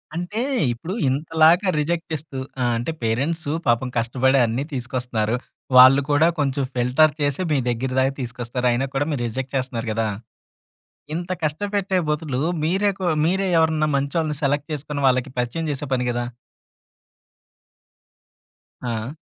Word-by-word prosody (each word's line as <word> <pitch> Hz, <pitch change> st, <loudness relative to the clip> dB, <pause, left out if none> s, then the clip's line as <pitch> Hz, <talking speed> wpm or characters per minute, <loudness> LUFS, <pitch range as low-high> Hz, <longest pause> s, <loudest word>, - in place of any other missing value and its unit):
అంటే 180 Hz, +7 st, -3 dB, 0.3 s
ఇప్పుడు 160 Hz, +10 st, -6 dB, 0.2 s
ఇంతలాగా 160 Hz, +6 st, +3 dB
రిజెక్ట్ 165 Hz, +3 st, -1 dB
చేస్తూ 150 Hz, -3 st, -5 dB, 0.2 s
ఆహ్, 120 Hz, -1 st, +2 dB
అంటే 120 Hz, +8 st, -2 dB
పేరెంట్స్ 145 Hz, +8 st, -1 dB, 0.2 s
పాపం 120 Hz, +2 st, +2 dB
కష్టపడి 130 Hz, +3 st, +2 dB
అన్ని 115 Hz, +4 st, -1 dB
తీసుకొస్తున్నారు. 125 Hz, -3 st, -2 dB, 0.4 s
వాళ్ళు 130 Hz, +2 st, +9 dB
కూడా 145 Hz, +3 st, +5 dB
కొంచెం 140 Hz, -1 st, 0 dB
ఫిల్టర్ 125 Hz, +5 st, +3 dB
చేసి 145 Hz, +2 st, 0 dB
మీ 150 Hz, -, +3 dB
దగ్గర 125 Hz, +2 st, -2 dB
దాకా 135 Hz, +1 st, +2 dB
తీసుకొస్తారు 125 Hz, 0 st, -3 dB
అయినా 125 Hz, +3 st, 0 dB
కూడా 140 Hz, +2 st, +1 dB
మీరు 140 Hz, -, -2 dB
రిజెక్ట్ 130 Hz, +4 st, -5 dB
చేస్తున్నారు 125 Hz, -3 st, -3 dB
గదా! 110 Hz, +1 st, 0 dB, 1.1 s
ఇంత 175 Hz, +2 st, -4 dB
కష్టపెట్టే 195 Hz, +4 st, -1 dB
బదులు 150 Hz, -4 st, -1 dB, 0.2 s
మీరే 190 Hz, +6 st, +2 dB
కొ 185 Hz, -, -2 dB, 0.2 s
మీరే 190 Hz, +3 st, +1 dB
ఎవరన్నా 160 Hz, -1 st, +2 dB
మంచోళ్ళని 150 Hz, +1 st, -1 dB
సెలెక్ట్ 145 Hz, +1 st, 0 dB
చేసుకొని 150 Hz, -1 st, -4 dB
వాళ్ళకి 130 Hz, +1 st, +2 dB
పరిచయం 125 Hz, +7 st, -2 dB
జేసే 145 Hz, +1 st, -4 dB
పని 125 Hz, -1 st, 0 dB
కదా! 120 Hz, 0 st, -2 dB, 2.6 s
ఆ! 120 Hz, +1 st, -3 dB
140 Hz, 135 wpm, -22 LUFS, 125-160 Hz, 2.6 s, వాళ్ళు